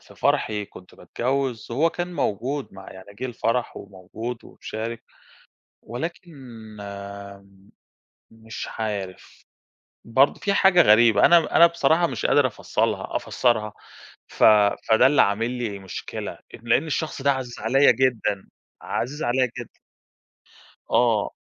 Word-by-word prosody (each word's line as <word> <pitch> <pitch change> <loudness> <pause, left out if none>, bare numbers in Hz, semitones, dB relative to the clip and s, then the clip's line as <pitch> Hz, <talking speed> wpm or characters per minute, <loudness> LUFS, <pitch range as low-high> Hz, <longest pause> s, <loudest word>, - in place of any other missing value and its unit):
في - - -18
فرحي 105 -1 0
كنت 90 -2 -15
باتجوز، 130 -2 -3
هو 160 +7 +2
كان 175 0 -5
موجود 135 - -2
مع 95 0 -12
يعني 95 +2 -13
جِه 110 - -7
الفرح، 120 0 -2
وموجود 105 +5 -8
ومشارك 115 +1 -7 0.8
ولكن 165 - -7 2.0
مش 110 0 -8
عارف 100 -4 -6 0.6
برضه 130 +5 +2
في 200 - 0
حاجة 190 -3 +5
غريبة 110 -1 +5
أنا 170 -2 +4
أنا 170 - +9
بصراحة 170 0 +2
مش - - -3
قادر 145 -2 +4
أفصلها 120 - -2
أفسَّرها، 110 -4 0 0.6
ف - - -3 0.5
فده 110 +2 +5
اللي 145 +1 +4
عامل 110 +4 0
لي 115 -5 -4
مشكلة، 95 -1 -6
أ - - -14 0.2
لأن 125 +5 +2
الشخص 155 -1 -3
ده 140 +1 +3
عزيز 130 -2 -5
عليَّ 135 0 +4
جدًا، 120 -5 -1 0.3
عزيز 145 +6 -4
عليَّ 125 +1 +1
جدًا. - - -11 1.1
آه. 115 -4 +2
120 Hz, 125 wpm, -23 LUFS, 110-140 Hz, 2.0 s, أنا